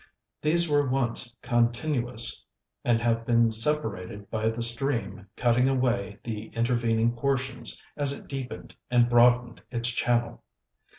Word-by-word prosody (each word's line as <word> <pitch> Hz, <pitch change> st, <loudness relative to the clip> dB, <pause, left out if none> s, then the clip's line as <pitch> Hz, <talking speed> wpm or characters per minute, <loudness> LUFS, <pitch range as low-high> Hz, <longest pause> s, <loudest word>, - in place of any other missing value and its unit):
These 170 Hz, +3 st, +3 dB
were 145 Hz, -3 st, +2 dB
once 120 Hz, -2 st, 0 dB
continuous, 120 Hz, 0 st, 0 dB, 0.4 s
and 120 Hz, -2 st, +3 dB
have 115 Hz, -1 st, +1 dB
been 115 Hz, -1 st, +3 dB
separated 110 Hz, -6 st, -3 dB
by 110 Hz, 0 st, 0 dB
the 115 Hz, +1 st, -3 dB
stream 115 Hz, -6 st, -3 dB
cutting 125 Hz, +2 st, +3 dB
away 120 Hz, -6 st, 0 dB
the 110 Hz, -1 st, -5 dB
intervening 115 Hz, -1 st, +1 dB
portions 130 Hz, -2 st, -1 dB
as 145 Hz, -2 st, +2 dB
it 140 Hz, -, -6 dB
deepened 135 Hz, -2 st, -6 dB, 0.2 s
and 120 Hz, -1 st, +4 dB
broadened 120 Hz, 0 st, +4 dB
its 120 Hz, -1 st, 0 dB
channel. 120 Hz, 0 st, 0 dB
120 Hz, 125 wpm, -27 LUFS, 115-130 Hz, 0.4 s, and